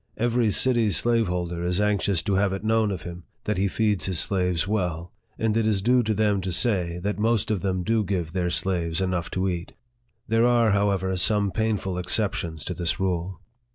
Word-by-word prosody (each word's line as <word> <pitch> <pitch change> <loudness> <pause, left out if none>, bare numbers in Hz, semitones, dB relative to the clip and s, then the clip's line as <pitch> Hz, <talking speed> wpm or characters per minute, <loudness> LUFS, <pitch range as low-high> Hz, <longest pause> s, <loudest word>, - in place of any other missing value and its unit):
Every 120 0 +1
city 120 0 +3
slaveholder 90 -4 0
is 90 +2 0
anxious 100 -4 +1
to 100 - -1
have 95 0 +1
it 95 - -5
known 110 -1 +2
of 95 -3 -5
him, 90 0 -9 0.2
that - - -2
he 100 - +2
feeds 105 -1 0
his 95 -3 0
slaves 90 -3 +1
well; 90 -5 -2 0.2
and 110 -1 0
it 115 -1 +1
is 100 -3 +1
due 125 +2 +4
to 110 -2 -1
them 105 -2 +1
to 95 0 -3
say, 90 -4 +1
that 105 +1 -2
most 110 -1 +1
of 100 -5 -1
them 95 -2 -1
do 110 +2 +1
give 90 -4 -3
their 90 -2 -1
slaves 85 -3 -1
enough 90 -3 -1
to 95 +1 -1
eat. 85 -2 -4 0.5
There 115 +2 +3
are, 120 -3 +3
however, 100 -2 +1
some 100 +1 +2
painful 105 -4 -1
exceptions 90 -5 -1
to - - -3
this 85 -2 -2
rule. 90 -1 -2
95 Hz, 195 wpm, -25 LUFS, 90-110 Hz, 0.5 s, due